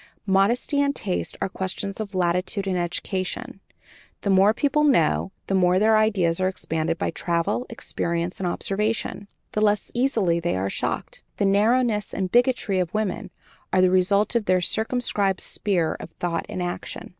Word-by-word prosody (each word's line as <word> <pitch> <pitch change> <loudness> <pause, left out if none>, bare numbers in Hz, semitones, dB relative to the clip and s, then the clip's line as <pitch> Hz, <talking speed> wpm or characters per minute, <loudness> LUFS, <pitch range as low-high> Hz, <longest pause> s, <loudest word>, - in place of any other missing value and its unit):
Modesty 215 +9 +2
and 280 0 +1
taste 190 -4 -3
are - - +1
questions 190 +1 -4
of 200 -3 -5
latitude 180 +3 0
and 190 -1 -1
education; 180 +2 -3 0.6
the 200 - 0
more 195 +2 +6
people 290 +5 +1
know, 190 - +3
the - - -2
more 180 -1 +4
their 220 +3 +4
ideas 195 -6 +2
are 185 - +3
expanded 165 -3 -2
by - - -1
travel, 175 +9 -1
experience, 170 -6 -3
and 185 - -1
observation, 205 +2 -2 0.2
the 210 - -1
less 210 -1 +1
easily 225 -9 +1
they 170 - -1
are 95 +1 -1
shocked. - - -3 0.2
The 200 - +1
narrowness 210 +2 +2
and 185 -2 -2
bigotry 245 -6 +2
of 175 -2 -1
women 215 -1 -2 0.4
are 185 - +3
the 185 0 +5
result 200 +4 +2
of 235 -3 +1
their 185 -2 +3
circumscribed 210 -1 0
sphere 175 -6 0
of - - -8
thought 170 0 -3
and 180 - -3
action. 175 0 -5
195 Hz, 165 wpm, -24 LUFS, 180-215 Hz, 0.6 s, more